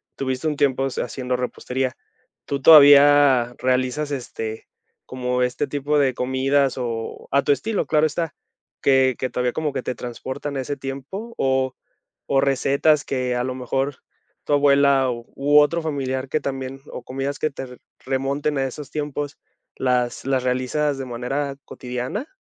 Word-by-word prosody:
tuviste 130 Hz, +2 st, -2 dB
un 150 Hz, -, 0 dB
tiempo 135 Hz, -1 st, +2 dB
haciendo 125 Hz, 0 st, -3 dB
repostería. 125 Hz, +1 st, -3 dB, 0.5 s
¿Tú 140 Hz, -1 st, -3 dB
todavía 145 Hz, -4 st, +7 dB
realizas 130 Hz, +3 st, 0 dB
este, 115 Hz, -4 st, -5 dB, 0.4 s
como 125 Hz, 0 st, -1 dB
este 125 Hz, +4 st, -1 dB
tipo 145 Hz, +1 st, 0 dB
de 135 Hz, -2 st, +2 dB
comidas 130 Hz, +2 st, +1 dB
o 115 Hz, -3 st, -4 dB
a 140 Hz, 0 st, +3 dB
tu -, -, +2 dB
estilo, 205 Hz, -, 0 dB
claro 155 Hz, 0 st, +3 dB
está? 165 Hz, -2 st, -3 dB, 0.5 s
Que 130 Hz, -2 st, +4 dB
que 130 Hz, -, -1 dB
todavía 125 Hz, -1 st, -1 dB
como 155 Hz, -3 st, -2 dB
que -, -, -3 dB
te 125 Hz, -, -2 dB
transportan 130 Hz, +4 st, -5 dB
a -, -, -1 dB
ese 140 Hz, +2 st, -4 dB
tiempo 140 Hz, -, -7 dB
o 130 Hz, -1 st, +1 dB, 0.5 s
o 135 Hz, -, +2 dB
recetas 140 Hz, +2 st, +2 dB
que 125 Hz, -2 st, -1 dB
a 125 Hz, -, 0 dB
lo 130 Hz, 0 st, -3 dB
mejor 135 Hz, +2 st, -2 dB, 0.5 s
tu -, -, 0 dB
abuela 140 Hz, -2 st, +4 dB
u 135 Hz, +5 st, +2 dB
otro 170 Hz, +3 st, +3 dB
familiar, 135 Hz, -4 st, -3 dB
que 155 Hz, -, 0 dB
también, 135 Hz, -1 st, -4 dB
o -, -, -7 dB
comidas 135 Hz, +2 st, -4 dB
que 155 Hz, -, 0 dB
te 130 Hz, -2 st, -8 dB, 0.3 s
remonten 140 Hz, +2 st, -1 dB
a 135 Hz, -, +1 dB
esos 135 Hz, +2 st, -7 dB
tiempos, 145 Hz, -1 st, -4 dB, 0.4 s
¿las 125 Hz, -2 st, 0 dB
las 130 Hz, -1 st, +1 dB
realizas 130 Hz, +3 st, 0 dB
de 135 Hz, -, -5 dB
manera 135 Hz, +3 st, -3 dB
cotidiana? 125 Hz, -, -5 dB
135 Hz, 155 wpm, -22 LUFS, 130-145 Hz, 0.5 s, todavía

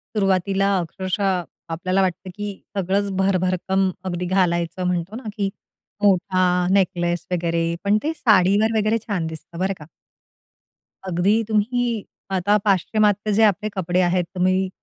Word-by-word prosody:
सुरुवातीला 195 Hz, 0 st, +2 dB
अक्षरशः 185 Hz, +2 st, -1 dB, 0.3 s
आपल्याला 185 Hz, +4 st, 0 dB
वाटतं, 185 Hz, 0 st, -2 dB
की 205 Hz, -1 st, -6 dB, 0.2 s
सगळंच 195 Hz, +2 st, 0 dB
भरभरकम 190 Hz, 0 st, +1 dB, 0.2 s
अगदी 180 Hz, -1 st, -2 dB
घालायचं 180 Hz, -1 st, 0 dB
म्हणतो 180 Hz, +3 st, -2 dB
ना 230 Hz, -3 st, -6 dB
कि 200 Hz, -1 st, 0 dB, 0.5 s
मोठा 185 Hz, -2 st, +3 dB
नेकलेस 175 Hz, -3 st, +1 dB
वगैरे. 170 Hz, -1 st, 0 dB
पण 205 Hz, +1 st, +3 dB
ते 315 Hz, -, -1 dB
साडीवर 215 Hz, -2 st, +3 dB
वगैरे 215 Hz, +1 st, +2 dB
छान 180 Hz, -6 st, -1 dB
दिसतं 160 Hz, +2 st, -9 dB
बरं 190 Hz, +1 st, 0 dB
का. 150 Hz, -, -10 dB, 1.2 s
अगदी 195 Hz, +6 st, +2 dB
तुम्ही 225 Hz, +1 st, 0 dB, 0.3 s
आता 195 Hz, +3 st, +2 dB
पाश्चिमात्य 205 Hz, +2 st, +2 dB
जे 220 Hz, +2 st, +4 dB
आपले 210 Hz, 0 st, +2 dB
कपडे 180 Hz, -1 st, +1 dB
आहेत, 180 Hz, 0 st, +2 dB
तुम्ही 185 Hz, +1 st, +1 dB
190 Hz, 130 wpm, -22 LUFS, 180-205 Hz, 1.2 s, जे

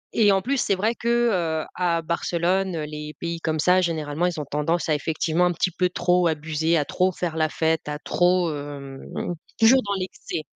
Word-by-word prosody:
et 210 Hz, -3 st, +5 dB
en 195 Hz, -1 st, +2 dB
plus, 275 Hz, +4 st, 0 dB
c'est 200 Hz, -, +1 dB
vrai 215 Hz, +5 st, +1 dB
que, 235 Hz, -, -6 dB, 0.2 s
heu, 160 Hz, -4 st, 0 dB
à 170 Hz, -2 st, 0 dB
Barcelone, 175 Hz, +3 st, 0 dB
heu, 155 Hz, -, -3 dB
les 150 Hz, 0 st, -7 dB
pays 170 Hz, -1 st, -3 dB
comme 160 Hz, -1 st, -1 dB
ça 180 Hz, +3 st, +4 dB
généralement, 160 Hz, -1 st, -1 dB
ils 175 Hz, -3 st, -3 dB
ont 150 Hz, -, -4 dB
tendance 150 Hz, +5 st, -1 dB
à 155 Hz, -, +4 dB
effectivement 160 Hz, +3 st, 0 dB
un -, -, +1 dB
petit 180 Hz, +2 st, 0 dB
peu 180 Hz, +1 st, 0 dB
trop 180 Hz, 0 st, +2 dB
abuser, 160 Hz, +1 st, 0 dB
à 150 Hz, -, +1 dB
trop 185 Hz, +5 st, +1 dB
faire 175 Hz, -2 st, -3 dB
la 155 Hz, -1 st, +1 dB
fête, 160 Hz, -1 st, 0 dB
à 150 Hz, -, -3 dB
trop, 175 Hz, 0 st, +2 dB
hem, 145 Hz, -2 st, -7 dB, 0.2 s
mmh -, -, -3 dB
mh, -, -, -1 dB, 0.3 s
toujours 250 Hz, +4 st, +6 dB
dans 200 Hz, 0 st, -2 dB
l'excès. 185 Hz, -3 st, -5 dB
170 Hz, 215 wpm, -24 LUFS, 155-180 Hz, 0.3 s, toujours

